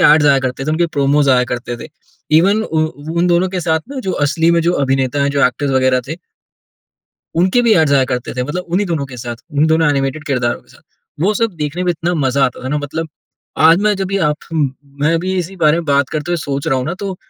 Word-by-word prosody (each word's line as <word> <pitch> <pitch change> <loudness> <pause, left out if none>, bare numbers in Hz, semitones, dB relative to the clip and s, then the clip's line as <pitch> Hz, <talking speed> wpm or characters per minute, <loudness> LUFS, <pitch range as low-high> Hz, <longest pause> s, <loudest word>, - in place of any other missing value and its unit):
Ads 150 0 +5
आया 140 -1 +5
करते 130 +1 -3
थे, 155 - -1
उनके 165 +2 +1
प्रोमोज़ 145 -2 +2
आया 125 -1 +4
करते 120 0 -4
थे। - - -9 0.5
ईवन 200 +6 +3
उ 160 -7 -1 0.3
वो 160 - -4
उन 175 - +3
दोनों 175 +1 +2
के 185 -1 -3
साथ 160 -2 0
ना, 280 - -5
जो 190 -6 -3
असली 165 +3 +2
में 170 0 +3
जो 170 +2 +2
अभिनेता 135 +1 0
हैं, 140 - +1
जो 140 0 +2
एक्टर्स 135 +3 -2
वगैरह 130 -1 +2
थे 160 - -4 1.2
उनके 185 +7 +3
भी 230 -2 +4
ऐड्स 160 -4 +3
आया 135 -2 +4
करते 125 -1 -4
थे, 125 - -1
मतलब 150 +8 -4
उन्ही 185 +4 0
दोनों 160 -6 -2
के 130 -2 -10
साथ, 120 0 -6 0.2
उन्ही 145 +2 +2
दोनों 160 0 +3
एनिमेटेड 140 +2 -2
किरदारों 125 -4 -1
के - - -30
साथ। - - -20 0.4
वो 195 +6 +2
सब 225 0 0
देखने 155 +4 -3
में 180 - +2
इतना 175 +1 -2
मज़ा 135 -3 +1
आता 125 - -3
था - - -3
ना 150 +2 0
मतलब, 155 +3 -4 0.5
आज 165 +2 +6
मैं 210 0 +3
जब 190 0 -3
ये 200 - +1
आप 150 - -1 0.2
अम 150 -4 +1 0.3
मैं 150 +3 +2
अभी 185 +3 -1
इसी 180 +2 -4
बारे 155 -2 +3
में 170 - -3
बात 140 -2 +2
करते 155 +2 -4
हुए - - +1
सोच 140 -3 -4
रहा 135 - +2
हूँ 130 - -2
ना, 170 - -2
तो 190 0 -5
155 Hz, 255 wpm, -16 LUFS, 135-175 Hz, 1.2 s, आज